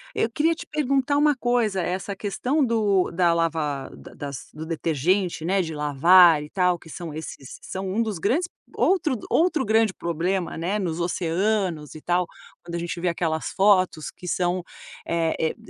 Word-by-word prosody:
Eu 225 - +1
queria 320 +5 +2
te - - -9
perguntar 275 -2 0
uma 295 0 +4
coisa 240 -6 +1
essa 185 +3 -3
questão 250 +9 0
do 210 -5 +2
da 175 0 +3
lavar 155 -5 -1
da - - -13
das 140 -2 -7
do 155 +1 -8
detergente, 165 +2 0
né, 190 +2 +2
de 160 -3 -5
lavar 155 +3 +6
e 150 - -9
tal, 180 -2 +1
que 160 - -15
são 165 0 -7
esses 150 -4 -8
são 190 0 -5
um 200 +5 0
dos 215 -4 -2
grandes 275 - +1 0.3
outro 350 -7 +2
outro 330 -4 +2
grande 220 -2 +3
problema, 170 +2 -2
né, 180 +6 -1
nos 175 -4 -2
oceanos 175 -1 -1
e 155 - -10
tal, 175 +2 +1 0.4
quando 170 - -6
a - - -2
gente 170 0 -4
vê 180 - 0
aquelas 165 -2 -2
fotos 185 -5 +3
que 180 - -10
são, 180 0 0 0.4
eh 165 -1 0
eh, 160 - 0
180 Hz, 175 wpm, -24 LUFS, 165-215 Hz, 0.4 s, lavar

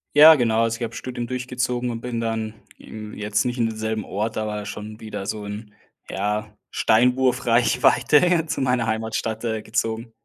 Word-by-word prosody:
Ja, 155 +2 +10
genau, 115 -5 +2
also 115 0 0
ich - - -3
habe 115 0 -4
Studium 120 -2 -5
durchgezogen 125 -1 -2
und 115 -1 -5
bin 120 -1 -3
dann 115 -1 -2 0.2
im 110 -1 -9
jetzt 105 +1 -1
nicht 125 0 -2
in 115 - +3
demselben 110 -1 -3
Ort, 105 +4 -3
aber 105 -1 -3
schon 105 +1 -7
wieder 105 -3 -6
so 105 -1 -4
in 105 +1 -7 0.4
ja, 105 +2 -3
Steinwurf 125 +3 +2
Reichweite 125 +8 +3
zu 150 - -2
meiner 125 -3 +1
Heimatstadt, 110 0 -2
äh, 110 -2 -2
gezogen. 110 +1 -2
115 Hz, 170 wpm, -23 LUFS, 110-125 Hz, 0.4 s, Ja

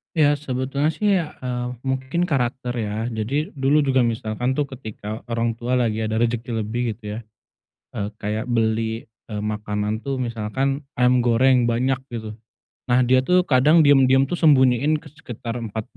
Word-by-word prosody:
Ya 145 -2 +4
sebetulnya 140 +1 -1
sih 210 - -1
ya, 165 -4 -2
eee, 125 -1 -3 0.2
mungkin 130 +7 -1
karakter 125 -3 -1
ya. 110 0 -2
Jadi, 125 - -2
dulu 140 +3 +3
juga 135 -3 +2
misalkan 115 +2 -1
tuh 140 +1 -1
ketika 110 -4 -7
orang 115 -1 -1
tua 120 +2 -3
lagi 115 -3 +1
ada 110 +1 -1
rejeki 120 +1 -1
lebih 115 +2 -2
gitu 105 -1 -7
ya, - - -4 0.8
eee, 100 - -2
kayak 110 +2 -3
beli, 115 -1 0 0.2
eee, 105 -2 -5
makanan 105 +1 -3
tuh 135 -2 -1
misalkan, 130 +5 -2
ayam 125 0 +3
goreng 125 +1 +3
banyak 125 +3 +1 0.2
gitu. 110 -1 -6 0.5
Nah, 125 0 +3
dia 130 +1 +3
tuh 180 0 +4
kadang 150 +2 +4
diem-diem 135 -2 +5
tuh 175 - -2
sembunyiin 145 0 +4
ke 150 - -13
sekitar 120 -2 -6
4 110 +1 -4
125 Hz, 160 wpm, -22 LUFS, 110-135 Hz, 0.8 s, diem-diem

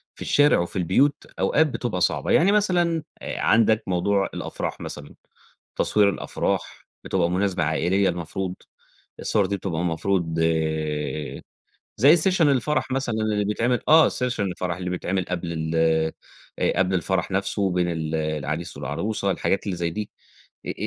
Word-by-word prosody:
في - - -14
الشارع 145 0 +4
وفي 85 - -2
البيوت 130 - +2
أوقات 160 +1 +3
بتبقى 120 -9 -3
صعبة، - - +1
يعني 180 +4 +5
مثلًا 175 -6 +2 0.2
عندك 110 0 +2
موضوع 95 +2 +1
الأفراح - - -4
مثلًا، 75 -1 -8 0.6
تصوير 105 -1 +3
الأفراح 100 - -3 0.2
بتبقى 90 -3 +1
مناسبة 95 -1 0
عائليّة 85 +5 +1
المفروض 90 +2 -4 0.7
الصور - - +1
دي 100 - -2
بتبقى 90 -4 -3
المفروض 85 -1 -1 1.6
زي 140 +10 +6
session 180 +2 +3
الفرح 145 -1 +2
مثلًا 130 -3 -1
اللي 110 -2 0
بيتعمل، 115 +4 0
آه 160 +1 +7
session 125 -2 -2
الفرح 90 -3 -2
اللي 90 0 -4
بيتعمل 90 +1 -2
قبل 85 -2 -4
ال 80 0 -3 0.8
آآ - - +1
قبل 95 0 +2
الفرح 95 +2 -1
نَفسه 95 0 0
بين 90 -1 +1
ال 80 -1 -3
العريس 75 +1 -3
والعروسة، 105 -2 -2
الحاجات 95 +1 -1
اللي 100 -3 -2
زي 85 -1 -1
دي 105 +5 -5 0.6
آآ - - -2
95 Hz, 140 wpm, -24 LUFS, 85-120 Hz, 1.6 s, آه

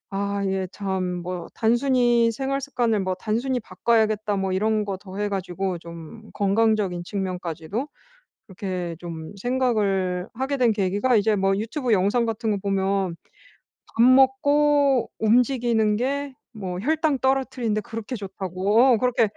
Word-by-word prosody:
아 200 0 -1
예. 190 -1 -1
참 185 -3 -3
뭐 180 -1 -5
단순히 240 0 +3
'생활 275 +3 -2
습관을 240 -6 0
뭐 185 -1 -1
단순히 235 +6 -1
바꿔야겠다.' 215 0 0
뭐 190 -1 -1
이런 215 +2 +1
거 195 -1 -3
더해 200 +2 -4
가지고 190 -2 -3
좀 170 +6 -11
건강적인 200 -3 +1
측면까지도 185 - -4 0.6
그렇게 180 -4 -4
좀 165 +1 -8
생각을 200 -6 0
하게 265 +3 -2
된 245 -3 +3
계기가 205 +4 +1
이제 215 0 +2
뭐 195 0 +2
유튜브 235 +3 -2
영상 205 +5 +2
같은 225 0 -2
거 205 - +1
보면 195 -2 0 0.8
"밥 230 - +4
먹고 270 +1 +4
움직이는 230 -1 +2
게 280 +3 -2 0.2
뭐 185 -4 -5
혈당 310 +3 +1
떨어뜨리는 260 -4 0
데 215 - 0
그렇게 225 +3 -6
좋다."고 200 +4 +1
그렇게 250 -2 +2
215 Hz, 285 characters per minute, -24 LUFS, 190-245 Hz, 0.8 s, 밥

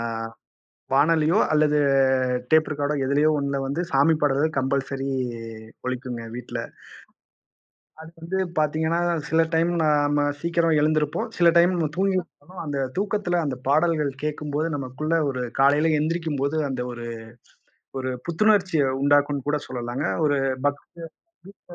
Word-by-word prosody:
ஆ - - -3 0.9
வானொலியோ 155 +4 +3 0.2
அல்லது 150 -1 +3 0.7
டேப் 155 0 +4
ரெக்காடோ 145 +1 -1
எதுலயோ 145 +3 +3
ஒண்ணுல 140 -1 -1
வந்து 140 +5 -2
சாமி 140 +4 +4
பாடல்கள் 145 +2 +1
கம்பல்சரி 135 0 -1 0.8
ஒலிக்குங்க 125 -2 -4
வீட்ல. 120 -1 -6 1.4
அது 160 - -11
வந்து 170 +3 -3 0.2
பார்த்தீங்கன்னா, 160 +2 0 0.3
சில 160 0 +3
டைம் 165 +2 +2
நாம 145 -1 +2 0.2
சீக்கிரம் 170 -1 +1
எழுந்திருப்போம். 150 -1 0
சில 175 - +5
டைம் 175 +2 +5
நம்ம 165 -3 0
தூங்கிட்டிருப்போம். 185 -2 -2
அந்தத் 135 -3 -2
தூக்கத்துல 195 -3 0
அந்தப் 130 -3 -4
பாடல்கள் 155 -1 +2
கேட்கும்போது 150 +1 -2
நமக்குள்ள 140 +4 -3 0.2
ஒரு 130 -2 -3 0.2
காலையில 150 +3 +4
எந்திரிக்கும்போது, 155 -2 -1
அந்த 130 -2 -3
ஒரு 120 0 -7 0.9
ஒரு 130 0 -3 0.2
புத்துணர்ச்சிய 180 -2 +2 0.2
உண்டாக்கும்ன்னு 145 -1 +2
கூடச் 145 0 -1
சொல்லலாங்க. 125 +3 -4 0.2
ஒரு 145 -1 +2 0.3
பக்த 145 0 0 0.7
வீட்டுல 180 -3 -16
150 Hz, 120 wpm, -24 LUFS, 140-165 Hz, 1.4 s, சில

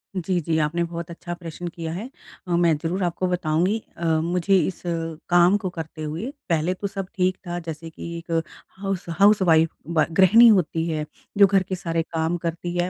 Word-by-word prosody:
जी, 180 0 0
जी। 160 +1 0
आपने 170 +3 0
बहुत 170 0 -5
अच्छा 175 +1 -6
प्रश्न 175 0 -7
किया 165 -1 -5
है। 220 +8 -5 0.4
अ, - - -4
मैं 170 -2 +3
ज़रूर 180 +3 -1
आपको 180 +1 -1
बताऊँगी। 180 +3 +1 0.2
अ, 170 - -4 0.2
मुझे 180 +3 +2
इस 175 +1 -1 0.5
काम 175 +2 +5
को 190 -2 -4
करते 160 0 -6
हुए 165 - -4 0.2
पहले 165 +2 +1
तो 200 +2 -4
सब 195 -1 -5
ठीक 185 0 +1
था, 175 0 -3
जैसे 165 0 -7
कि 170 +1 -7
एक 170 0 -9 0.5
हाउस 195 -2 -2
हाउस 205 0 +6
वाइफ़ 165 -2 +4 0.2
ब 155 - +4
गृहिणी 225 +6 +8
होती 170 -6 +3
है। 155 -2 -2 0.3
जो 200 - +9
घर 195 -1 +3
के 185 0 -4
सारे 165 -2 -1
काम 165 +1 -1
करती 170 +1 -4
है। 175 +1 +1
175 Hz, 195 wpm, -23 LUFS, 165-185 Hz, 0.5 s, जो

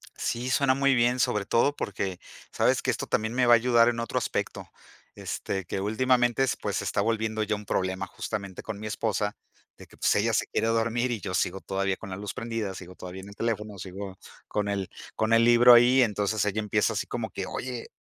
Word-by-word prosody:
Sí, 120 +2 -2
suena 130 0 +3
muy 140 0 +3
bien, 120 +1 +2
sobre 105 -4 +1
todo 140 +8 +2
porque 95 -5 -3 0.3
sabes - - +2
que - - +1
esto - - -4
también 110 +1 0
me 125 0 +2
va 120 - +8
a - - +10
ayudar 120 0 +4
en 115 -1 -2
otro 115 - -3
aspecto, - - -3 0.5
este, 95 -2 -4
que 95 - -3
últimamente 120 +3 +2
es 130 - +1
pues, - - -3
se - - -2
está - - 0
volviendo 110 0 -1
ya 105 0 -1
un 105 0 -9
problema 95 -1 -1
justamente 100 -3 -5
con 105 -2 -6
mi 110 - -7
esposa, 105 -1 -1 0.4
de - - -14
que, - - -19
pues, - - +2
ella - - +1
se - - +2
quiere 115 - -1
dormir 115 +2 +1
y 120 -3 -2
yo 90 - -5
sigo 90 +1 0
todavía 95 0 -1
con 95 - -9
la - - -3
luz 100 +1 -6
prendida, 115 -4 -3
sigo 90 0 -9
todavía 90 +1 -8
en 100 - -11
el 100 - -12
teléfono, 105 -3 -3
sigo 95 +1 -7 0.3
con 105 -1 -1
el 100 -2 -2 0.3
con 110 +1 +1
el 115 0 +6
libro 120 +1 +8
ahí, 125 +2 +6
entonces 105 -1 0
ella 105 +1 -1
empieza 105 +1 +1
así 105 - -2
como 115 -2 -4
que: 95 - -4
"Oye, 125 +3 -5
110 Hz, 225 wpm, -27 LUFS, 100-120 Hz, 0.5 s, a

